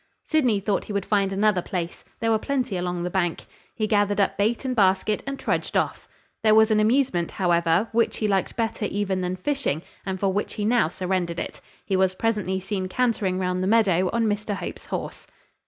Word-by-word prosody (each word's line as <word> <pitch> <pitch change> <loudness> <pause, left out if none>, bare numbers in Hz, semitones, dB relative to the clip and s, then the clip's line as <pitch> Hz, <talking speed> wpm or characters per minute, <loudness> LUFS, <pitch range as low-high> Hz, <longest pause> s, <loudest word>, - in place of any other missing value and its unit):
Sydney 255 -10 +2
thought 200 0 -1
he 210 - -6
would 200 -1 -1
find 200 -2 +1
another 200 -1 +2
place: 175 -1 -4 0.2
there 225 0 +2
were 220 - +3
plenty 255 -4 -1
along 180 -1 -2
the 180 - -3
bank. 175 -3 -1 0.3
He 215 - 0
gathered 205 -1 +2
up 200 - +2
bait 225 +6 0
and 255 -1 -1
basket, 195 0 +2
and 275 0 -3
trudged - - -1
off. - - -1 0.3
There 215 -1 +5
was 220 0 +5
an 215 - +4
amusement, 215 -6 +2
however, 170 +2 +2
which 230 +1 +1
he 215 - 0
liked 195 -3 0
better 225 -2 -1
even 195 -2 -1
than 180 0 -2
fishing; 265 - -1 0.2
and 190 -1 -3
for 195 -1 +1
which 205 - -2
he 205 - -2
now 235 -5 +3
surrendered 180 -1 -2
it. - - -6 0.2
He 195 - 0
was 190 0 +2
presently 205 -3 0
seen 190 0 -3
cantering 205 -4 0
round 180 -1 -1
the 185 - 0
meadow 190 -5 +3
on 230 -1 +1
Mr 210 -1 -1
Hope's 195 - -7
horse. - - -5
200 Hz, 205 wpm, -24 LUFS, 185-220 Hz, 0.3 s, There